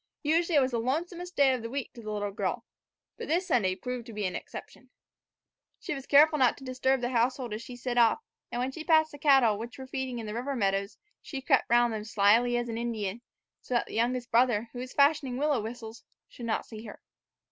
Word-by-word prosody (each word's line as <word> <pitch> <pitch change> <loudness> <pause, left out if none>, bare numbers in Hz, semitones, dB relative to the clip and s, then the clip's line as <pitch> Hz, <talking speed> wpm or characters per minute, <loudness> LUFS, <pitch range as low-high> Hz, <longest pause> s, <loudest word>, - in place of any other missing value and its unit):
Usually 330 +3 +2
it 285 - +6
was 260 0 +1
the 235 - 0
lonesomest 345 +8 -3
day 275 -2 +5
of 255 - -2
the 230 - -5
week 270 0 -4
to 235 - -11
the 215 -1 -6
little 205 -1 -2
girl; 205 +4 -3 0.5
but - - -6
this 345 +4 +1
Sunday 215 - +1
proved 250 +4 -5
to 230 - -9
be 210 -1 -3
an 185 - -2
exception. - - -9 0.9
She - - -4
was 270 -2 -7
careful 300 +2 +6
not 255 -2 +4
to - - -13
disturb 260 0 0
the 245 - -1
household 245 -1 0
as 215 - -4
she 245 +1 -9
set 245 0 -1
off, 235 - +4 0.3
and - - -3
when 255 +2 -1
she 315 +4 -7
passed 315 -1 +4
the 290 - -11
cattle, 265 -8 +4
which 230 +1 -7
were 265 - -8
feeding 260 -1 -4
in 230 - -5
the 210 - -5
river 255 +5 -3
meadows, 195 -2 -1 0.2
she 275 - -6
crept 270 0 +2
round 240 0 +4
them 215 - -3
as 215 - -9
slyly 225 +4 +4
as 240 0 -2
an 230 -1 -4
Indian, 225 -2 -3 0.4
so 250 - -4
that 240 - +2
the - - -11
youngest 245 +2 -1
brother, 235 -2 +3
who 245 - -6
was 255 0 -6
fashioning 280 -3 +2
willow 290 -3 +1
whistles, 225 0 -8 0.2
should 235 - -8
not 220 - -1
see 220 -1 -10
her. 210 - -10
245 Hz, 235 wpm, -29 LUFS, 225-270 Hz, 0.9 s, it